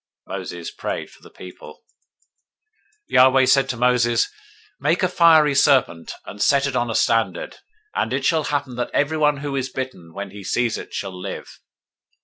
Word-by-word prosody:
Moses -, -, -6 dB
prayed -, -, -5 dB
for -, -, -20 dB
the -, -, -15 dB
people. -, -, -13 dB, 1.3 s
021:008 -, -, -13 dB
Yahweh 130 Hz, +1 st, +6 dB
said 135 Hz, +1 st, +3 dB
to 125 Hz, -, -3 dB
Moses, 120 Hz, -1 st, +2 dB, 0.5 s
Make 175 Hz, -, +1 dB
you -, -, +5 dB
a -, -, -10 dB
fiery 160 Hz, -4 st, +5 dB
serpent, 130 Hz, -, +2 dB
and 100 Hz, -, -9 dB
set 140 Hz, 0 st, +3 dB
it 140 Hz, -2 st, -3 dB
on 120 Hz, -1 st, 0 dB
a 115 Hz, -, -3 dB
standard: 110 Hz, -6 st, 0 dB, 0.4 s
and 110 Hz, -, -1 dB
it 135 Hz, +1 st, -1 dB
shall 160 Hz, 0 st, +2 dB
happen, 140 Hz, -4 st, -3 dB
that 120 Hz, -, -2 dB
everyone 150 Hz, 0 st, +2 dB
who 140 Hz, -1 st, -3 dB
is 130 Hz, -1 st, -2 dB
bitten, 130 Hz, -11 st, -6 dB
when 100 Hz, 0 st, -6 dB
he 100 Hz, 0 st, -10 dB
sees 120 Hz, +4 st, -1 dB
it, -, -, -10 dB
shall 95 Hz, -1 st, -4 dB
live. 90 Hz, -, -8 dB
130 Hz, 175 wpm, -21 LUFS, 115-140 Hz, 1.3 s, Yahweh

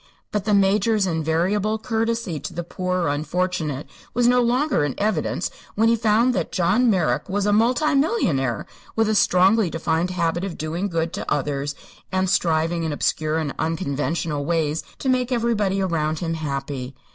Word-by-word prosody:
But 205 Hz, -2 st, -2 dB
the 210 Hz, -1 st, +3 dB
Major's 200 Hz, +2 st, +3 dB
invariable 180 Hz, +6 st, 0 dB
courtesy 225 Hz, -6 st, -2 dB
to -, -, -7 dB
the 175 Hz, -, -3 dB
poor 180 Hz, +1 st, -2 dB
or 170 Hz, -, +1 dB
unfortunate 155 Hz, -1 st, -2 dB, 0.3 s
was 245 Hz, 0 st, +3 dB
no 250 Hz, 0 st, +4 dB
longer 250 Hz, -, +2 dB
in 145 Hz, -3 st, -2 dB
evidence 215 Hz, +2 st, -1 dB, 0.2 s
when 225 Hz, +1 st, +3 dB
he 230 Hz, -, +4 dB
found 230 Hz, +2 st, +3 dB
that 175 Hz, -7 st, -2 dB
John 200 Hz, +8 st, +2 dB
Merrick 190 Hz, -1 st, +1 dB
was 200 Hz, +1 st, 0 dB
a 205 Hz, -, +3 dB
multi 250 Hz, +8 st, +3 dB
millionaire 165 Hz, -, +1 dB, 0.3 s
with 225 Hz, -1 st, +2 dB
a 215 Hz, -, +2 dB
strongly 195 Hz, +1 st, +4 dB
defined 165 Hz, +2 st, -1 dB
habit 175 Hz, -1 st, -1 dB
of 190 Hz, -4 st, -4 dB
doing 165 Hz, +5 st, -2 dB
good 165 Hz, -2 st, -2 dB
to 205 Hz, -, -5 dB
others 145 Hz, 0 st, -1 dB, 0.4 s
and 190 Hz, 0 st, +1 dB
striving 165 Hz, 0 st, +1 dB
in 160 Hz, -1 st, -1 dB
obscure 155 Hz, +1 st, 0 dB
and 155 Hz, -3 st, -2 dB
unconventional 155 Hz, -1 st, -1 dB
ways 160 Hz, -1 st, 0 dB, 0.2 s
to -, -, -5 dB
make 255 Hz, -1 st, +1 dB
everybody 215 Hz, -5 st, +1 dB
around 160 Hz, -4 st, 0 dB
him 165 Hz, -1 st, -2 dB
happy. 140 Hz, -4 st, -4 dB
180 Hz, 170 wpm, -23 LUFS, 160-215 Hz, 0.4 s, no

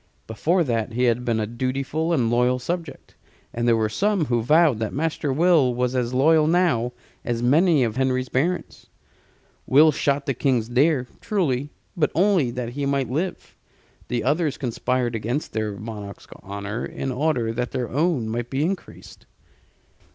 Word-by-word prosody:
Before 170 Hz, +11 st, +1 dB
that 115 Hz, -5 st, -2 dB
he 125 Hz, +2 st, 0 dB
had 120 Hz, 0 st, +2 dB
been 115 Hz, -2 st, 0 dB
a 110 Hz, -, 0 dB
dutiful 135 Hz, +7 st, -2 dB
and 125 Hz, -8 st, +1 dB
loyal 125 Hz, +1 st, +2 dB
subject, 165 Hz, +4 st, -5 dB, 0.4 s
and 120 Hz, +1 st, -1 dB
there 115 Hz, -1 st, +4 dB
were 110 Hz, -1 st, +1 dB
some 195 Hz, -, 0 dB
who 120 Hz, -3 st, 0 dB
vowed 150 Hz, 0 st, +4 dB
that 110 Hz, +1 st, -3 dB
Master 155 Hz, -1 st, -1 dB
Will 150 Hz, -4 st, +3 dB
was 125 Hz, 0 st, 0 dB
as 125 Hz, -1 st, 0 dB
loyal 155 Hz, +4 st, +4 dB
now 160 Hz, -9 st, +2 dB, 0.3 s
as 120 Hz, -1 st, -2 dB
many 155 Hz, +3 st, +4 dB
of 115 Hz, 0 st, -2 dB
Henry's 130 Hz, -1 st, 0 dB
barons. 170 Hz, +9 st, -2 dB, 0.8 s
Will 155 Hz, +4 st, +6 dB
shot 140 Hz, -1 st, 0 dB
the 135 Hz, -, 0 dB
King's 125 Hz, -3 st, 0 dB
deer, 130 Hz, +1 st, +2 dB
truly, 145 Hz, -9 st, -1 dB, 0.3 s
but 155 Hz, -4 st, +1 dB
only 180 Hz, -6 st, +3 dB
that 120 Hz, -1 st, -4 dB
he 140 Hz, +3 st, -3 dB
might 135 Hz, -3 st, -1 dB
live: 170 Hz, +7 st, -3 dB, 0.5 s
the 120 Hz, -1 st, -2 dB
others 150 Hz, +2 st, 0 dB
conspired 125 Hz, -1 st, -1 dB
against 120 Hz, +6 st, -3 dB
their 110 Hz, -2 st, -2 dB
monarch's 105 Hz, -1 st, -8 dB, 0.2 s
honor, 100 Hz, +3 st, -5 dB
in 135 Hz, -, -4 dB
order 125 Hz, -4 st, 0 dB
that 125 Hz, +1 st, -2 dB
their 125 Hz, -2 st, -3 dB
own 145 Hz, -4 st, 0 dB
might 120 Hz, +2 st, -3 dB
be 135 Hz, +2 st, -1 dB
increased. 185 Hz, 0 st, -7 dB
130 Hz, 165 wpm, -23 LUFS, 120-155 Hz, 0.8 s, Will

